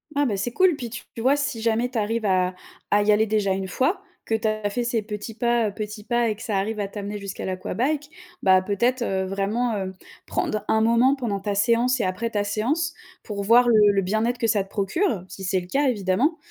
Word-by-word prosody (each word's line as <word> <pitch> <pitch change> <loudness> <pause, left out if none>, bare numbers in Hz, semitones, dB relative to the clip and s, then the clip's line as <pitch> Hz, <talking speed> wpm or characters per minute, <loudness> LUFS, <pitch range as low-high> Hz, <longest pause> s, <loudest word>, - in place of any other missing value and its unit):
Ah 290 0 +3
bah 220 -6 0
c'est 220 +5 -2
cool. 370 +4 +4
Puis 245 -4 -6
tu 230 - -7 0.2
vois, 265 +4 +3
si 285 -6 -2
jamais 230 +2 +1
tu 250 - -5
arrives 220 +1 -1
à 185 -2 +2 0.4
à 205 - +5
y 210 - +4
aller 215 +1 +3
déjà 210 -2 +1
une 190 0 -3
fois, 270 - 0 0.2
que 225 - 0
tu 220 0 -1
as 215 -1 -1
fait 240 +4 -2
ces 235 -1 0
petits 210 +1 -6
pas, 235 0 +1
heu, - - -10
petits 210 0 -6
pas 240 +1 +1
et 215 - -1
que 215 - -14
ça 215 -5 -1
arrive 215 +3 -2
à 200 - -2
t'amener 205 0 -5
jusqu'à 200 -1 -6
l'aquabike. 260 +11 -2 0.3
Bah 185 -1 +6
peut-être, 235 +7 0
heu, 190 -4 -1
vraiment, 200 +5 -1
heu, 190 -1 -4 0.3
prendre 215 -1 -2
un 220 - +3
moment 235 +4 +4
pendant 230 -7 -2
ta 200 +1 -2
séance 235 +5 +2
et - - 0
après 185 +5 -1
ta 205 -2 -1
séance, 270 +11 -1 0.3
pour 205 -2 -4
voir 240 +4 +5
le 210 -3 +6
le 195 - +2
bien-être 220 +6 0
que 235 -2 0
ça 210 -3 +2
te - - -22
procure, 205 - 0
si 190 - -8
c'est 185 +1 +1
le 175 - -11
cas 280 +9 +1
évidemment. 235 - +1
220 Hz, 235 wpm, -24 LUFS, 200-240 Hz, 0.4 s, Bah